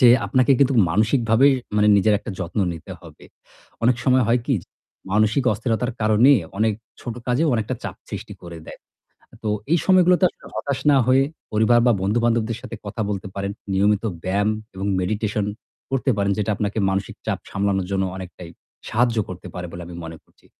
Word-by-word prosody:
যে 125 Hz, -, +8 dB, 0.2 s
আপনাকে 130 Hz, +1 st, +3 dB
কিন্তু 140 Hz, -1 st, +3 dB, 0.2 s
মানসিকভাবে 115 Hz, +5 st, +3 dB, 0.3 s
মানে 105 Hz, 0 st, +4 dB
নিজের 105 Hz, +1 st, +3 dB
একটা 115 Hz, -, -7 dB
যত্ন 90 Hz, +2 st, -4 dB
নিতে 80 Hz, -3 st, -9 dB
হবে। -, -, -15 dB, 0.6 s
অনেক 125 Hz, 0 st, +4 dB
সময় 130 Hz, -2 st, +4 dB
হয় 120 Hz, +1 st, +3 dB
কি? 135 Hz, -, +2 dB
যে -, -, -21 dB, 0.5 s
মানসিক 110 Hz, +5 st, +2 dB
অস্থিরতার 120 Hz, 0 st, -1 dB
কারণে 110 Hz, +6 st, +5 dB, 0.3 s
অনেক 110 Hz, -1 st, +2 dB, 0.3 s
ছোট 120 Hz, -2 st, -5 dB
কাজেও 135 Hz, +6 st, +2 dB
অনেকটা 110 Hz, -2 st, -1 dB
চাপ -, -, -5 dB
সৃষ্টি -, -, -6 dB
করে 85 Hz, -1 st, -9 dB
দেয়। -, -, -10 dB, 0.7 s
তো 105 Hz, -, -1 dB, 0.2 s
এই 170 Hz, -, +5 dB
সময়গুলোতে 180 Hz, -1 st, +4 dB
আসলে -, -, -20 dB
হতাশ 140 Hz, -2 st, -2 dB
না 140 Hz, -, +5 dB
হয়ে 135 Hz, +1 st, +5 dB, 0.3 s
পরিবার 110 Hz, +2 st, +4 dB
বা -, -, +6 dB
বন্ধু-বান্ধবদের 115 Hz, +2 st, +1 dB
সাথে -, -, -7 dB
কথা 105 Hz, +2 st, -4 dB
বলতে 95 Hz, -2 st, -3 dB
পারেন। 100 Hz, 0 st, -3 dB, 0.2 s
নিয়মিত 100 Hz, +2 st, +2 dB, 0.2 s
ব্যায়াম 100 Hz, +3 st, +1 dB, 0.3 s
এবং 95 Hz, +2 st, -3 dB
meditation 105 Hz, +2 st, -1 dB, 0.5 s
করতে 135 Hz, 0 st, +1 dB
পারেন 100 Hz, 0 st, +1 dB
যেটা 105 Hz, 0 st, 0 dB
আপনাকে 105 Hz, +1 st, -3 dB
মানসিক 95 Hz, 0 st, -2 dB
চাপ -, -, -1 dB
সামলানোর 100 Hz, -2 st, -1 dB
জন্য 95 Hz, -1 st, +1 dB
অনেকটাই 90 Hz, -2 st, -9 dB, 0.4 s
সাহায্য 115 Hz, 0 st, +1 dB
করতে 90 Hz, 0 st, -8 dB
পারে 90 Hz, 0 st, -5 dB
বলে 85 Hz, -, -8 dB
আমি 85 Hz, -, -9 dB
মনে 80 Hz, 0 st, -8 dB
করছি। -, -, -31 dB
110 Hz, 175 wpm, -22 LUFS, 100-125 Hz, 0.7 s, যে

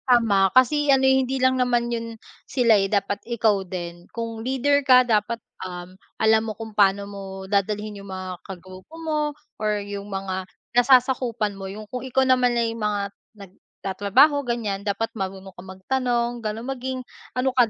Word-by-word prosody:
Tama 220 Hz, -6 st, +4 dB
kasi 290 Hz, +3 st, +4 dB
ano 265 Hz, -1 st, +5 dB
hindi 265 Hz, 0 st, +3 dB
lang 260 Hz, 0 st, +2 dB
naman 240 Hz, -1 st, +1 dB
yun 230 Hz, 0 st, -3 dB, 0.4 s
sila 245 Hz, -4 st, +4 dB
eh, 195 Hz, -1 st, +1 dB
dapat 200 Hz, 0 st, 0 dB
ikaw 220 Hz, -4 st, +1 dB
din. 175 Hz, -1 st, -7 dB
Kung 230 Hz, -1 st, -5 dB
leader 265 Hz, +4 st, +2 dB
ka 255 Hz, -2 st, +6 dB
dapat 225 Hz, 0 st, +1 dB, 0.8 s
alam 220 Hz, 0 st, +4 dB
mo 220 Hz, -1 st, -5 dB
kung 220 Hz, -1 st, -8 dB
paano 200 Hz, -1 st, +3 dB
mo 200 Hz, 0 st, -8 dB, 0.2 s
dadalhin 205 Hz, +1 st, -1 dB
yung 200 Hz, -, -11 dB
mga 185 Hz, -1 st, -6 dB
kagrupo 185 Hz, -, -11 dB
mo 315 Hz, -2 st, -1 dB, 0.4 s
or 210 Hz, -1 st, +1 dB
yung 200 Hz, 0 st, -6 dB
mga 190 Hz, -1 st, -4 dB, 0.2 s
nasasakupan 245 Hz, -3 st, +3 dB
mo. 195 Hz, -1 st, -7 dB
Yung 210 Hz, +2 st, -8 dB
kung 250 Hz, +4 st, -6 dB
ikaw 265 Hz, 0 st, +1 dB
naman 250 Hz, -2 st, +3 dB
ay 230 Hz, -1 st, +1 dB
mga 205 Hz, -3 st, -2 dB, 0.2 s
nagtatrabaho 200 Hz, -, +1 dB
ganyan, 230 Hz, -6 st, -2 dB
dapat 205 Hz, +2 st, -2 dB
marunong 190 Hz, -2 st, -6 dB
ka 180 Hz, -, -12 dB
magtanong 240 Hz, +5 st, -2 dB
ganon, 220 Hz, +1 st, -4 dB
maging 260 Hz, 0 st, -4 dB, 0.4 s
ano 255 Hz, +1 st, +1 dB
ka 245 Hz, -3 st, +4 dB
220 Hz, 160 wpm, -24 LUFS, 200-250 Hz, 0.8 s, ka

